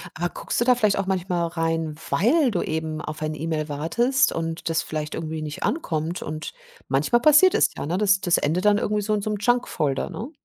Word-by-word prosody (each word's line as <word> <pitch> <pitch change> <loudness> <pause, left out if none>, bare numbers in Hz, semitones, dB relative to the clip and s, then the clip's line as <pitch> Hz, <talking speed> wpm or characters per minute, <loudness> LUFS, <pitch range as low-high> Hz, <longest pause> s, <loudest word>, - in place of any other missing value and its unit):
Aber 175 +2 -1
guckst - - -3
du 240 - +2
da 250 - +5
vielleicht 215 -4 +2
auch 195 - -2
manchmal 180 -2 -1
rein, 165 -2 -2 0.2
weil 260 +3 +3
du 180 - -1
eben 155 -1 -3
auf 155 0 -6
ein 155 - -2
E-Mail 155 0 -3
wartest 235 - +1
und 165 0 -3
das 160 -1 0
vielleicht 155 -1 -4
irgendwie 160 -1 -4
nicht 150 -1 -5
ankommt 170 - -2
und 155 +1 -6 0.3
manchmal 140 - +2
passiert 310 +5 +6
es - - +4
ja, - - -5
ne? 175 - -1
Das 200 -1 +3
das 175 -2 +2
endet 175 +7 0
dann 205 0 +5
irgendwie 210 0 0
so 215 +1 0
in 205 - -2
so 215 - -2
'nem 210 - -1
Junk-Folder, 200 - 0
ne? 240 +6 -6
170 Hz, 220 wpm, -24 LUFS, 155-210 Hz, 0.3 s, passiert